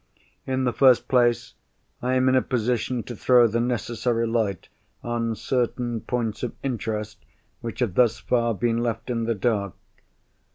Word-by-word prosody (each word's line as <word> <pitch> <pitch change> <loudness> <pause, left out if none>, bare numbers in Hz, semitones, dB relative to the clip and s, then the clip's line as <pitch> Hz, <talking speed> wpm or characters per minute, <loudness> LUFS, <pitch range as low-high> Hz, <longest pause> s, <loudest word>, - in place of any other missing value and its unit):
In 130 0 0
the 125 -2 +1
first 130 -2 +5
place, 120 -2 +2 0.5
I 125 +1 0
am 130 0 +3
in 130 - +4
a 130 - +4
position 120 0 -1
to 120 - -7
throw 120 +2 +5
the 115 +1 +1
necessary 120 0 -1
light 110 -5 -1 0.4
on 115 -1 -1
certain 120 0 -1
points 115 -3 -2
of 125 - -3
interest 110 -5 -4 0.4
which 115 +2 -6
have 115 -7 0
thus 115 +1 +3
far 115 -2 0
been 115 +2 0
left 120 +1 -2
in 115 -1 -1
the 115 0 0
dark. 100 -2 -1
120 Hz, 160 wpm, -24 LUFS, 115-125 Hz, 0.5 s, first